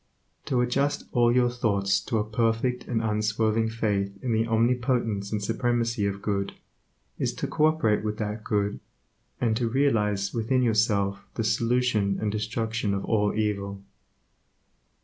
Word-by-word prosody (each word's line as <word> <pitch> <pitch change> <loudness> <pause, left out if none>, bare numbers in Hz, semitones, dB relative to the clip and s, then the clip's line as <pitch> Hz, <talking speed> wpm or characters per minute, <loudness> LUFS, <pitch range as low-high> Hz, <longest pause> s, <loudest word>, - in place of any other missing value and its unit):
To 125 -2 +1
adjust 140 +4 0
all 120 -1 +4
your 125 0 +3
thoughts 100 -5 +1
to 115 - 0
a 105 - +1
perfect 115 +3 0
and 115 -2 -1
unswerving 110 +1 +1
faith 105 -3 -1
in 125 -3 0
the 110 +1 +1
omnipotence 115 -3 +1
and 105 -1 -2
supremacy 115 -1 0
of 100 0 -4
Good, 100 -1 -1 0.7
is - - -1
to - - -3
co 155 - +1
operate 115 -10 +1
with 105 0 -2
that 105 0 -4
Good, 105 -1 -1 0.6
and 115 -3 +1
to 115 -1 0
realize 105 -7 +1
within 125 +3 +1
yourself 105 -3 +1
the 115 - -1
solution 115 -3 +1
and 105 -1 -1
destruction 110 0 -1
of 100 - -3
all 105 -2 +1
evil. 100 -2 -2
110 Hz, 150 wpm, -26 LUFS, 105-120 Hz, 0.7 s, all